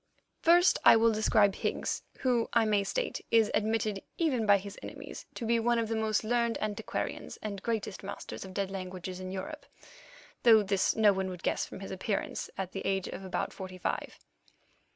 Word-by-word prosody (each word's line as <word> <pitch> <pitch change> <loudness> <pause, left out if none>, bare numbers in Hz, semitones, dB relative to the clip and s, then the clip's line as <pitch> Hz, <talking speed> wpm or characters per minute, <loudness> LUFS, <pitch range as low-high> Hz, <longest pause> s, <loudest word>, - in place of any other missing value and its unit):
First, 350 +2 +5
I - - +9
will 225 0 +5
describe 215 -2 +3
Higgs, - - -2 0.2
who, 245 -3 +2
I 230 -1 +4
may 205 -2 +2
state, - - -2
is 225 -2 +4
admitted, 215 -2 0 0.2
even 260 -10 +1
by 205 0 +7
his 200 +1 -8
enemies, - - -9
to 235 - -4
be 230 +1 +3
one 240 +1 +2
of 225 -1 0
the 225 - 0
most 220 -1 +1
learned 235 +1 +1
antiquarians 210 -1 -4
and 200 -2 -4
greatest 220 -3 -2
masters 200 - -7
of 190 -1 -10
dead 195 -1 -1
languages 185 -1 -6
in 185 0 -6
Europe, 295 +12 -6 0.7
though 225 -3 +7
this 195 -1 +1
no 215 -2 +5
one 190 0 -2
would 180 -2 -8
guess - - 0
from - - -9
his 195 - -7
appearance 195 +2 -3
at 190 -1 -3
the - - -5
age 195 -1 -1
of - - -7
about 190 - -3
forty 185 -1 -8
five. 180 - -3
210 Hz, 190 wpm, -30 LUFS, 190-230 Hz, 0.7 s, I